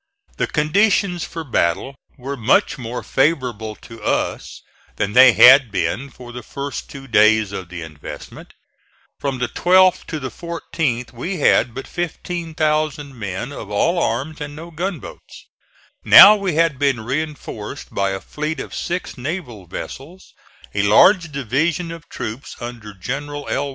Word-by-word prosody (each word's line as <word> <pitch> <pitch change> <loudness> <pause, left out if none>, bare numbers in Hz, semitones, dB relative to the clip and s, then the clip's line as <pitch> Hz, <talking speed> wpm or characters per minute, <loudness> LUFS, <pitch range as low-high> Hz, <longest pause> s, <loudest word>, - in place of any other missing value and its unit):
The - - 0
conditions 180 +3 +1
for 165 -1 -7
battle 120 - 0 0.2
were 135 +2 -5
much 130 +2 +2
more 120 0 -5
favorable 125 -7 0
to 115 -1 -12
us - - -2 0.3
than 105 - -2
they 125 0 +8
had 125 +4 +8
been 135 +6 -2
for 125 -1 -12
the 125 0 -7
first 140 +4 -6
two 135 -1 -10
days 110 -2 +4
of 95 -3 -6
the 85 -2 -7
investment. 75 -2 -10 0.6
From 135 -2 -2
the 125 0 -1
12th 185 +7 +3
to 155 - -4
the 130 -3 -5
14th 160 -6 -3
we 175 +11 -4
had 125 -5 +3
but 135 - -6
15,000 155 -4 -2
men 100 +5 -4
of 120 - -8
all 170 - +1
arms 145 +4 -2
and 145 0 -6
no 165 +3 -9
gunboats. 175 -1 -7 0.6
Now 205 +2 +10
we 195 -5 -2
had 165 -4 +2
been 135 -5 +1
reinforced 140 -2 -5
by 100 0 0
a 95 0 -3
fleet 155 +7 -5
of - - -7
six 175 -6 -4
naval 125 - -5
vessels, 150 - -9 0.4
a 100 - +1
large 165 - +5
division 150 +6 -1
of 165 -2 -10
troops 115 +6 -6
under 120 -4 -8
General 145 +8 -5
L. 140 +1 -1
140 Hz, 150 wpm, -20 LUFS, 115-160 Hz, 0.6 s, Now